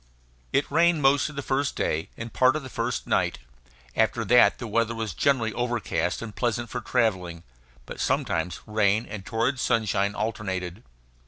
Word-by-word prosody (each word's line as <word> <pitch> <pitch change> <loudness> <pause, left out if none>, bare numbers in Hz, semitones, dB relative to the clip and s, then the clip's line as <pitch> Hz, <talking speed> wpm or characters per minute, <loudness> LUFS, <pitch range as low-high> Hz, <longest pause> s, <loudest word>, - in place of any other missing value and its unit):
It 140 +1 +1
rained 165 0 +3
most 135 +2 +4
of 150 - -11
the 145 - -4
first 140 +1 0
day 80 +1 -1
and 115 0 -7
part 130 +1 +4
of 155 - -3
the 130 - -9
first - - -2
night. - - +1 0.6
After - - +1
that 125 +1 +5
the - - -6
weather 115 +1 0
was 110 -4 -3
generally 120 - +1
overcast 120 -2 -1
and 110 -3 -8
pleasant 120 -1 -1
for 125 - -3
travelling; 90 -7 0 0.4
but - - -9
sometimes 80 +1 -1
rain 105 0 +2
and 105 -4 -7
torrid 115 +6 -1
sunshine 105 -4 +1
alternated. 95 -3 -3
115 Hz, 165 wpm, -26 LUFS, 105-130 Hz, 0.6 s, that